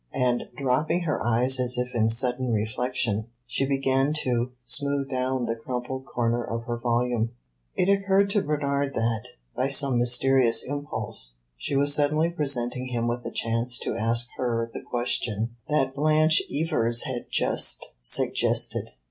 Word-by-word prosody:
And 125 -1 +1
dropping 150 +6 0
her 160 -3 -2
eyes 125 +3 +3
as 125 0 +2
if 125 0 -2
in 110 -2 +2
sudden 125 +2 +2
reflection, 110 0 -1 0.2
she 130 +2 -1
began 135 +1 +1
to 125 0 -1
smooth 140 +2 +1
down 130 -1 -1
the 115 - -2
crumpled 125 +3 -5
corner 120 0 -1
of 115 0 -4
her 120 0 -4
volume. 120 -1 0 0.4
It 180 - +1
occurred 200 0 +2
to 205 - +2
Bernard 140 -2 -1
that 115 -1 -1 0.3
by 130 - 0
some 135 -2 +4
mysterious 125 -1 +4
impulse 110 - -2 0.2
she - - -4
was 145 +1 +5
suddenly 155 +3 +2
presenting 130 -5 0
him 120 -2 -2
with 120 +1 -2
a - - -5
chance 115 +2 0
to - - -3
ask 115 +2 +1
her 115 -2 -1
the - - -6
question 115 -1 -2
that 135 -3 +1
Blanche 155 +2 +3
Evers 130 -7 0
had 130 -3 -5
just - - +1
suggested. - - +1
125 Hz, 150 wpm, -25 LUFS, 120-140 Hz, 0.4 s, was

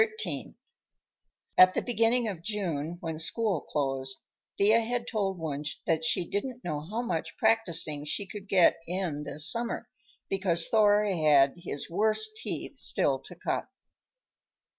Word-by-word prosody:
XIII - - -2 1.0
At 185 0 +8
the - - +1
beginning 235 0 +2
of 190 -6 -5
June, 175 -5 -3
when 160 -2 -5
school 195 +1 +1
closed, 135 -2 -1 0.3
Thea 215 +3 +4
had 235 +1 -3
told 195 -4 -2
Wunsch 150 -2 -3
that 160 -1 0
she 170 +2 +3
didn't 250 +5 -4
know 155 -4 -3
how 210 +11 -4
much 165 -9 -4
practicing 170 -10 +2
she 175 +7 -1
could 200 0 -10
get 180 -3 +4
in 175 -4 -3
this 150 +1 +3
summer 235 0 +1 0.4
because 185 -4 +2
Thor 210 -1 +4
had 150 -8 +3
his 170 -5 -5
worst 215 - +1
teeth 445 - -6
still - - 0
to - - -12
cut. - - -3
185 Hz, 140 wpm, -28 LUFS, 155-220 Hz, 1.0 s, At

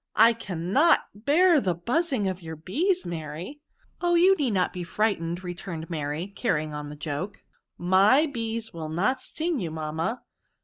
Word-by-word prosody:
*' - - -60
I - - +1
cannot 210 - +2
bear 300 - +4
the 180 -5 0
buzzing 245 - 0
of 185 -1 -3
your 160 -1 -7
bees, 335 - 0
Maiy.*' 170 - -6 0.2
'' - - -37
Oh 350 -1 +2
i - - +5
you 375 +3 +6
need 285 -8 0
not 185 -4 +1
be 180 - -4
frightened," 175 -2 -1
re 175 -1 -4
turned 170 -2 -7
Mary, 150 +1 -2
carrying 155 -10 -1
on 150 0 -5
the 150 - -8
joke, 150 +7 -5 0.3
" - - -58 0.2
my 215 +11 +6
oees 230 -5 -4
will 160 -2 -5
not 210 +12 0
sting 320 +2 -2
you, 175 -5 -3
mamma. 160 +8 -3
190 Hz, 185 wpm, -26 LUFS, 165-265 Hz, 0.3 s, you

